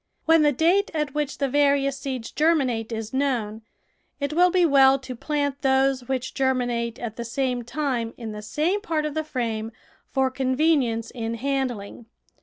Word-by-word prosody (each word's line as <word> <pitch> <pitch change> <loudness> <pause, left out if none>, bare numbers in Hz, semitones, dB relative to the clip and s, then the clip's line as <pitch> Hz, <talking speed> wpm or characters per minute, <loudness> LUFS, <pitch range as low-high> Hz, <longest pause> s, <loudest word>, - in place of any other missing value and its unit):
When 325 0 +5
the 295 -1 +4
date 345 +8 +2
at 300 -3 -1
which 295 -1 -2
the 280 - 0
various 280 0 +2
seeds 260 -4 -5
ger 325 +3 +3
minate 240 -6 -1
is 225 0 -5
known, 240 -6 -1 0.6
it 285 +1 -2
will 355 +3 +5
be 360 -1 +3
well 270 -3 +6
to 260 -1 -8
plant 285 +1 -2
those 265 -2 +2
which 260 -1 -2
germinate 245 -3 0
at 225 -2 -6
the 235 - -3
same 250 +1 -1
time 240 -2 -2
in 230 -3 -6
the 210 0 -7
same 315 - -1
part 320 -7 -1
of 300 - -3
the 315 +1 -1
frame 230 -6 -3 0.4
for 265 -1 +1
convenience 260 -3 +1
in 230 -1 -4
handling. 245 -4 -3
265 Hz, 175 wpm, -24 LUFS, 235-295 Hz, 0.6 s, well